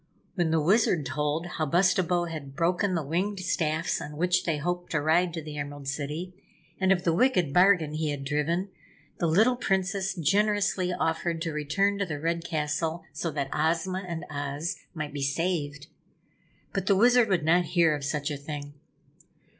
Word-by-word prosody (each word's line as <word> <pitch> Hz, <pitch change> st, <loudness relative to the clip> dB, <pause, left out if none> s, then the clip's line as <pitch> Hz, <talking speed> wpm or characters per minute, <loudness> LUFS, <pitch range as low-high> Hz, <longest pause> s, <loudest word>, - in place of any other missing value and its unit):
When 175 Hz, -4 st, 0 dB
the 160 Hz, 0 st, +2 dB
Wizard 175 Hz, -2 st, +3 dB
told 150 Hz, +3 st, -1 dB
how 160 Hz, -3 st, -3 dB
Bustabo 180 Hz, +1 st, +2 dB
had 150 Hz, -5 st, -7 dB
broken 180 Hz, +4 st, +1 dB
the 165 Hz, -, -1 dB
winged 185 Hz, +7 st, -1 dB
staffs 165 Hz, -2 st, 0 dB
on 150 Hz, 0 st, -7 dB
which 180 Hz, +2 st, +2 dB
they 160 Hz, -3 st, 0 dB
hoped 175 Hz, +4 st, -3 dB
to 150 Hz, -, +2 dB
ride 165 Hz, +4 st, +2 dB
to 160 Hz, -, -5 dB
the 150 Hz, -1 st, -7 dB
Emerald 145 Hz, -1 st, -6 dB
City, 150 Hz, +6 st, -4 dB, 0.5 s
and 190 Hz, 0 st, +3 dB
of 180 Hz, -2 st, +2 dB
the 165 Hz, -, +2 dB
wicked 180 Hz, -, +2 dB
bargain 180 Hz, -4 st, +4 dB
he 155 Hz, 0 st, -1 dB
had 145 Hz, -1 st, -3 dB
driven, 160 Hz, +7 st, 0 dB, 0.5 s
the 170 Hz, -, +1 dB
little 220 Hz, +10 st, +4 dB
Princess 195 Hz, -3 st, -1 dB
generously 195 Hz, +2 st, +1 dB
offered 165 Hz, -1 st, -1 dB
to 165 Hz, -, -2 dB
return 175 Hz, +7 st, 0 dB
to 200 Hz, -, +1 dB
the 150 Hz, -3 st, -4 dB
Red 165 Hz, +2 st, -1 dB
Castle 160 Hz, +1 st, -2 dB
so 170 Hz, -, -2 dB
that 140 Hz, -3 st, -3 dB
Ozma 170 Hz, +4 st, 0 dB
and 170 Hz, -1 st, -5 dB
Oz 145 Hz, +3 st, -3 dB, 0.2 s
might 150 Hz, -2 st, -4 dB
be 145 Hz, -, -4 dB
saved. 145 Hz, -1 st, -1 dB, 0.9 s
But 195 Hz, -2 st, -2 dB
the 200 Hz, -, +5 dB
Wizard 240 Hz, +2 st, +5 dB
would 175 Hz, -5 st, +1 dB
not 175 Hz, +2 st, +4 dB
hear 165 Hz, -2 st, +3 dB
of 145 Hz, -, -6 dB
such 145 Hz, +1 st, -2 dB
a 145 Hz, -, -3 dB
thing. 145 Hz, 0 st, -7 dB
165 Hz, 180 wpm, -27 LUFS, 150-185 Hz, 0.9 s, the